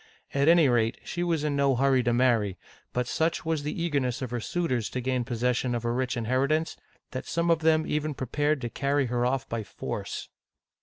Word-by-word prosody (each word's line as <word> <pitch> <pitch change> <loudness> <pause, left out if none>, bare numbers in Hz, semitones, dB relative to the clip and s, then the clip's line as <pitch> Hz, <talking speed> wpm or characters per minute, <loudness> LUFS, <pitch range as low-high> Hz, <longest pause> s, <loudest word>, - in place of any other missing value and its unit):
At 140 +1 +2
any 165 -2 +6
rate, 115 -3 +2
she 175 - -3
was 165 -3 0
in 150 -2 0
no 140 -1 +3
hurry 135 0 +3
to 120 -1 +1
marry; 115 -6 +2 0.3
but 125 0 -1
such 160 +6 0
was 160 -2 0
the 150 +3 -4
eagerness 135 -6 0
of 125 - -5
her 120 - -1
suitors 125 -4 -1
to 130 - -3
gain 130 0 0
possession 125 0 0
of 120 - -3
her 120 0 0
rich 130 0 -1
inheritance, 135 +7 +1 0.4
that 130 - -5
some 170 0 +1
of 165 - +3
them 160 0 +3
even 150 -1 -1
prepared 145 +3 0
to 120 - -3
carry 140 0 +1
her 120 0 +2
off 130 0 -1
by 115 -1 -3
force. 95 - -5
130 Hz, 205 wpm, -27 LUFS, 120-150 Hz, 0.4 s, any